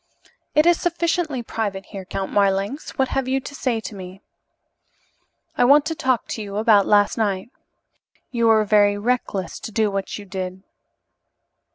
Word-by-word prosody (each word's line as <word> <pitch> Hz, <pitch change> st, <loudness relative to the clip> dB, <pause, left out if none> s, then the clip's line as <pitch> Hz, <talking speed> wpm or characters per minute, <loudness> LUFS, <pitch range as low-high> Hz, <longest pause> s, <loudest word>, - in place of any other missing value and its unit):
"It 305 Hz, -, +5 dB
is 345 Hz, -1 st, +4 dB
sufficiently 340 Hz, -6 st, -1 dB
private 205 Hz, -4 st, -4 dB
here, 195 Hz, -3 st, -9 dB
Count 190 Hz, +1 st, -4 dB
Marlanx. 200 Hz, +7 st, 0 dB
What 265 Hz, -1 st, +1 dB
have 270 Hz, -1 st, -1 dB
you 265 Hz, +1 st, +1 dB
to 285 Hz, -, -9 dB
say 255 Hz, -4 st, -1 dB
to 220 Hz, -, -7 dB
me?" 190 Hz, 0 st, -10 dB, 1.3 s
"I -, -, +3 dB
want 285 Hz, +4 st, +6 dB
to 325 Hz, -, -1 dB
talk 260 Hz, -7 st, 0 dB, 0.2 s
about 205 Hz, 0 st, +2 dB
last 205 Hz, +1 st, +3 dB
night. 200 Hz, +1 st, -1 dB, 0.8 s
You 235 Hz, -2 st, +1 dB
were 220 Hz, -1 st, +4 dB
very 205 Hz, -1 st, +4 dB
reckless 205 Hz, -5 st, -2 dB
to -, -, -7 dB
do 215 Hz, -1 st, +1 dB
what 195 Hz, -1 st, -3 dB
you 205 Hz, -, -10 dB
did." 185 Hz, -1 st, -6 dB
215 Hz, 155 wpm, -22 LUFS, 195-260 Hz, 1.3 s, want